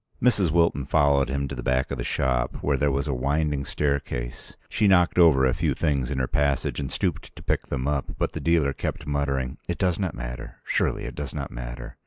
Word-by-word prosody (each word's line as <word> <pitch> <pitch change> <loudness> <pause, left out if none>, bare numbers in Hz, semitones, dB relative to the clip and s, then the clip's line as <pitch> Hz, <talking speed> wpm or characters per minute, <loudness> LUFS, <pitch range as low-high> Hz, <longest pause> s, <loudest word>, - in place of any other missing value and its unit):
Mrs. 105 -8 +3
Wilton 85 -3 +2
followed 70 -1 +3
him 70 +1 -1
to 70 - -6
the 60 - -5
back 65 +3 0
of 70 - -3
the - - -1
shop, 65 -1 -1
where 70 - +2
there 70 +2 +2
was 70 +3 -1
a 70 - 0
winding 70 +2 0
staircase. 70 -4 -3
She 105 - +1
knocked 90 -2 +4
over 75 -6 +6
a 65 - +3
few - - 0
things 70 -6 0
in 70 - -2
her 65 - +1
passage 70 +1 0
and 70 -2 -3
stooped - - -2
to - - -11
pick - - -1
them 65 -1 -2
up, 70 -2 -1
but - - 0
the - - -5
dealer 80 -5 +2
kept 75 - -4
muttering, 70 -3 -1
"It - - -2
does 90 -2 +1
not 95 -5 -2
matter—surely - - -3
it - - -5
does 75 -1 -6
not 70 -3 -4
matter." - - -7
70 Hz, 220 wpm, -25 LUFS, 65-75 Hz, -, over